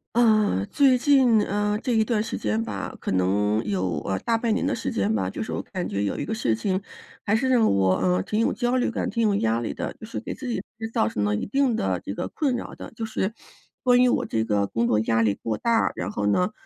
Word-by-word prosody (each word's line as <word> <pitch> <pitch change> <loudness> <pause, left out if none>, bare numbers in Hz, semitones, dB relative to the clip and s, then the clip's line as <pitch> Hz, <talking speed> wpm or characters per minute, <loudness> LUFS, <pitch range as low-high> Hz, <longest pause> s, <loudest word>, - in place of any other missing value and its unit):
嗯， 215 - +3
最 275 -3 +5
近， 250 -4 +4
呃， 210 +1 0
这 255 - -2
一 220 -1 +3
段 220 -1 +1
时 220 - -4
间 110 +1 -1
吧， 100 -3 -5
可 - - -3
能 105 +4 +1
有， 90 -5 -1
呃， 95 -1 -1
大 230 - 0
半 225 -1 0
年 - - 0
的 275 -1 0
时 - - -3
间 100 +2 0
吧， 95 -3 0
就 95 - -5
是 - - -4
我 - - -2
感 185 -3 -5
觉 100 - -1
有 100 - -2
一 - - -2
个 185 - -3
事 120 - +1
情 185 - -1 0.5
还 205 - +2
是 260 +4 +1
让 245 -3 +4
我， 95 -1 +3
呃， 90 -1 +1
挺 210 - -2
有 230 - +2
焦 245 +2 0
虑 245 - +1
感， - - -2
挺 230 0 +1
有 205 - +2
压 115 - +1
力 120 - -3
的。 - - -4
就 - - -8
是 225 - -5
给 - - -6
自 265 - -7
己 240 - -1 0.2
其 225 - -5
实 225 - -6
造 105 - +2
成 105 -2 -2
了 105 0 +1
一 - - -3
定 270 +1 +1
的 95 - -1
这 100 - -6
个 - - -3
困 280 -6 -1
扰 240 - -6
的， - - -9
就 225 - -5
是 220 -1 -2 0.5
关 250 -1 +5
于 - - +5
我 - - +2
这 110 0 -1
个 105 -2 0
工 115 +3 0
作 105 - +2
压 115 +1 +2
力 105 -2 +2
过 110 -2 -2
大， 230 -1 +2
然 90 +3 -4
后 105 -1 -1
呢， 180 - +2
185 Hz, 290 characters per minute, -25 LUFS, -, 0.5 s, 最